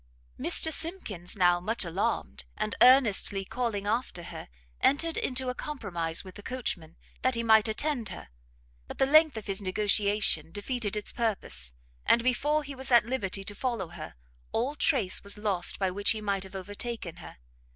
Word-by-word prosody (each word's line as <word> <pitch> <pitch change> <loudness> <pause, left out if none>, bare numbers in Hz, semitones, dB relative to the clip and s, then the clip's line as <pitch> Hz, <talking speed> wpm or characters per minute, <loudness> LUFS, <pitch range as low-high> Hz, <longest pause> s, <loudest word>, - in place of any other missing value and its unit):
Mr 320 - +6
Simkins 230 - 0
now, 175 -1 +4
much 215 +3 0
alarmed, 65 - -3
and 215 - -2
earnestly 220 -6 +5
calling 225 -3 -3
after 215 -4 -2
her, - - -9 0.3
entered 325 +4 +2
into 260 0 -1
a 250 - -1
compromise 180 - -1
with 185 -1 -11
the 205 - -11
coachman, 190 -10 -5 0.2
that 255 -1 +1
he 230 - -2
might 220 -1 +5
attend 235 0 -2
her; 175 - -10 0.6
but - - -9
the 270 - +3
length 310 -1 +5
of 220 - -6
his 195 0 -1
negociation 200 -4 +1
defeated 210 +1 -3
its 210 - -3
purpose, 65 - -2 0.3
and 235 - +4
before 295 +5 +1
he 280 0 -8
was 265 0 -5
at 240 -2 +6
liberty 200 -6 -2
to 205 - -5
follow 225 -5 -3
her, 170 -3 -9 0.4
all 250 +6 -1
trace 250 - +1
was 200 +1 -2
lost 200 -4 +1
by 190 -2 0
which 200 +2 +2
he 220 - +2
might 200 -2 -1
have 190 0 -8
overtaken 205 -2 -6
her. 170 - -12
210 Hz, 170 wpm, -28 LUFS, 190-255 Hz, 0.6 s, Mr